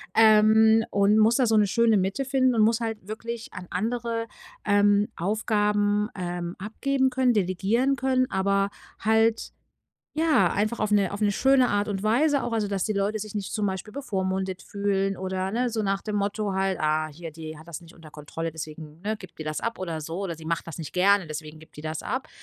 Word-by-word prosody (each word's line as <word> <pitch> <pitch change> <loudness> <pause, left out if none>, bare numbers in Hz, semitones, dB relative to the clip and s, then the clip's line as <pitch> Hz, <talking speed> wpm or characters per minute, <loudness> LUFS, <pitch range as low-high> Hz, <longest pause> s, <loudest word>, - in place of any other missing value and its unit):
Ähm, 220 0 +6
und 200 +1 +3
muss 225 +2 +5
da 255 - +3
so 220 -1 +3
'ne 205 -1 +4
schöne 225 +1 +3
Mitte 195 +8 0
finden 260 -2 +2
und 220 - +3
muss 230 +2 +3
halt 225 -4 -4
wirklich 230 +1 -6
an 180 -1 -8
andere, 230 +3 -2 0.4
ähm, 205 +1 +3
Aufgaben, 210 +1 +1
ähm, 175 -1 -4
abgeben 265 +6 0
können, 255 -1 +2
delegieren 210 +7 +1
können, 260 -1 +1
aber 195 +1 +1 0.3
halt 220 +1 +2 0.6
ja, 305 - +3
einfach 215 +3 -1
auf 215 -1 0
'ne 200 -3 +3
auf 200 - -4
'ne 205 -1 +3
schöne 265 +1 +3
Art 205 +1 0
und 195 -1 -3
Weise 280 +6 +2
auch. 240 - -3
Also, 215 -3 0
dass 195 -2 -1
die 215 - 0
Leute 200 +2 0
sich 215 0 -7
nicht 200 -2 -3
zum 210 - -1
Beispiel 190 +3 -5
bevormundet 190 -7 -2
fühlen 195 -1 -1
oder 190 0 -3
ne, 245 +1 0
so 220 -1 -2
nach 195 0 -1
dem 210 -1 -3
Motto 205 0 -1
halt: 190 -1 0
„Ah, 155 0 +1
hier, 160 +2 -9
die 155 0 -8
hat 155 - -14
das 170 -2 -7
nicht 170 0 -16
unter 160 -2 -14
Kontrolle, 160 +3 -5
deswegen, 155 0 -9
ne, 215 +3 -2
gibt 185 -5 -14
die - - -4
das 155 0 -3
ab 230 - -3
oder 165 -4 -4
so 165 +4 -5
oder 170 -3 -3
sie 160 - -13
macht 165 +1 -2
das 165 - -7
nicht 160 -3 -7
gerne, 195 0 +3
deswegen 155 0 -7
gibt 160 -1 -18
die - - -5
das 155 0 -4
ab.“ 260 0 -3
205 Hz, 210 wpm, -26 LUFS, 185-225 Hz, 0.6 s, Ähm